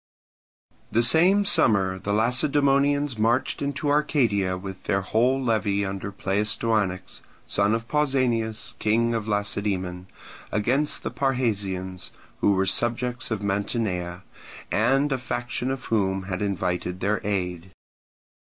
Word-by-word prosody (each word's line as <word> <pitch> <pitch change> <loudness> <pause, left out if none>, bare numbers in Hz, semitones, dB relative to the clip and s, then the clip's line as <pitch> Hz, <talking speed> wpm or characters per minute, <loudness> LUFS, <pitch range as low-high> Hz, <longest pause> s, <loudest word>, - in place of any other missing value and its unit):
The 115 +2 +3
same 180 - +5
summer 95 - +2
the 100 +2 -3
Lacedaemonians 140 +3 +2
marched 115 +4 +1
into 145 +1 -1
Arcadia 115 -11 +1
with 95 0 -8
their 95 - +1
whole 120 +7 +2
levy 105 -5 +1
under 95 +1 -4
Pleistoanax, 100 -1 -1 0.2
son 100 +2 +2
of 115 0 -4
Pausanias, 125 -7 0
king 115 +2 +2
of 110 -2 -2
Lacedaemon, 100 -3 -2 0.4
against 130 +8 0
the - - -3
Parrhasians, 100 -9 -1 0.3
who 100 - +3
were 95 0 +2
subjects 120 +4 -1
of 110 -3 -3
Mantinea, 95 -3 -2 0.5
and 135 +6 +2
a 135 - 0
faction 120 0 -3
of 135 -1 -4
whom 95 -3 0
had 95 0 -4
invited 90 -2 -2
their 105 +3 0
aid. 90 -3 -2
110 Hz, 120 wpm, -25 LUFS, 95-125 Hz, 0.5 s, same